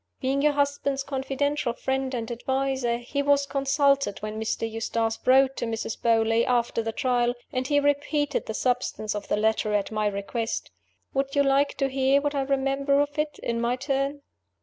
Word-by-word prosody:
Being 270 +1 0
your 300 0 +3
husband's 280 -1 0
confidential 275 -1 -1
friend 265 +1 -2
and 230 -1 -4
adviser, 265 0 -1
he 250 +4 -3
was 285 0 +3
consulted 275 -3 +1
when 215 0 -4
Mr. 220 +1 -1
Eustace 225 0 -2
wrote 265 +1 +5
to - - -2
Mrs. 225 -1 -4
Beauly, 225 0 +3
after 240 -2 +1
the 225 0 -3
Trial; 245 0 +1 0.2
and 255 0 -1
he 290 0 +3
repeated 290 0 0
the 220 - -4
substance 245 -4 -1
of 210 -1 -5
the - - 0
letter, 215 0 +1
at 205 +1 -1
my 215 -1 0
request. 205 +3 -3 0.4
Would 275 +1 -1
you 285 - +4
like 275 +1 +2
to 275 - +1
hear 270 +1 +3
what 290 0 -1
I 280 - 0
remember 275 +1 +1
of 290 +1 -1
it, 300 -1 -1
in 230 0 -1
my 240 +1 +1
turn?" 275 +2 -2
265 Hz, 180 wpm, -26 LUFS, 230-280 Hz, 0.4 s, wrote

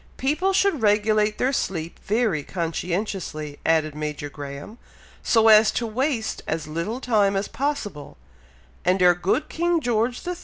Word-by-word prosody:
"People 310 +8 +1
should 385 - +2
regulate 210 0 +2
their 260 +2 +1
sleep 170 -9 -3
very 215 -7 +1
conscientiously," 170 -2 -4
added 160 -2 +2
Major 150 -1 -5
Graham, 145 - -8 0.4
"so 225 -1 +3
as 215 0 +7
to 240 - -1
waste 230 0 -2
as 160 0 -2
little 170 +10 -4
time 210 -6 +2
as 195 +1 -1
possible; 230 - -4 0.7
and 185 +1 +2
our 180 0 +7
good 180 - -1
king 345 0 0
George 240 -1 -1
III. 360 -1 -3
210 Hz, 145 wpm, -24 LUFS, 165-245 Hz, 0.7 s, as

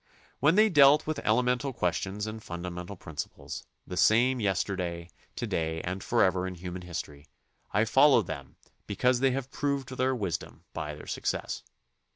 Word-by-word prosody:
When 150 +5 +4
they 215 +2 +6
dealt 145 -5 +6
with 155 -1 -2
elemental 125 +4 +1
questions 95 +1 -1
and 110 0 -6
funda 85 -1 -6
mental 90 +3 -7
principles, 80 -4 -7 0.2
the 90 - -6
same 120 +7 +4
yesterday, 90 -4 -2 0.2
to - - -3
day, 80 0 -1
and 90 +2 -4
forever 95 -5 +2
in 95 - -5
human 90 +1 -6
history, 75 -4 -7 0.4
I 105 +2 +3
follow 135 0 +5
them 70 -6 -7 0.3
because 125 +5 +2
they 135 +1 +4
have 135 +1 -3
proved 140 -2 -2
their 130 +1 +1
wisdom 100 -8 -4
by 75 -1 -4
their 75 - -11
success. - - -3
100 Hz, 160 wpm, -29 LUFS, 90-130 Hz, 0.4 s, they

